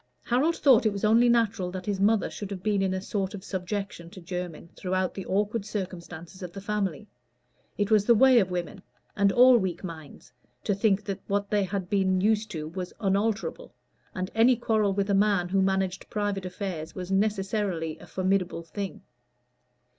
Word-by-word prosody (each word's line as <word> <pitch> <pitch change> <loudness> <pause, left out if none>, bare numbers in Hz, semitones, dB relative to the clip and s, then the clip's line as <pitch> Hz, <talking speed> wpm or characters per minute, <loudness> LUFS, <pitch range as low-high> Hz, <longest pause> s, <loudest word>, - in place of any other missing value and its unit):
Harold 280 +8 +2
thought 265 -6 +5
it - - +2
was 200 +1 -2
only 230 +3 +5
natural 220 -6 +2
that 185 0 -6
his 200 -2 -2
mother 210 +1 +3
should 205 - -7
have 190 -2 -6
been 210 -2 +1
in 190 -1 +1
a 190 - -1
sort 195 0 -3
of 190 - -9
subjection 190 -2 -4
to 185 - -11
Jermyn 180 -2 -6
throughout 185 0 -1
the 195 - -7
awkward 205 +3 0
circumstances 180 -3 -7
of 180 -2 -6
the 195 - -6
family. 205 -1 -2 0.7
It 205 +1 0
was 210 -2 +4
the 235 - +6
way 260 +1 +6
of 190 -4 +1
women, 180 +2 -4 0.3
and 200 -1 +3
all 250 +2 +7
weak 185 -3 -3
minds, 155 -7 -9 0.3
to 205 - +1
think 200 0 +2
that 195 -1 -4
what 200 0 -1
they 205 -2 +2
had 190 -1 -3
been 190 -1 +2
used 215 +2 +1
to 155 -6 -5
was 180 +2 -6
unalterable, 215 - -1 0.4
and 185 0 -3
any 235 +3 +5
quarrel 220 -3 +1
with 200 +1 0
a - - +3
man 200 -3 +2
who 195 +1 +2
managed 190 -1 -1
private 205 -3 -2
affairs 180 -4 -5
was 185 0 -6
necessarily 195 -5 -1
a - - -13
formidable 185 -2 -1
thing. 200 +3 -6
195 Hz, 185 wpm, -27 LUFS, 185-210 Hz, 0.7 s, all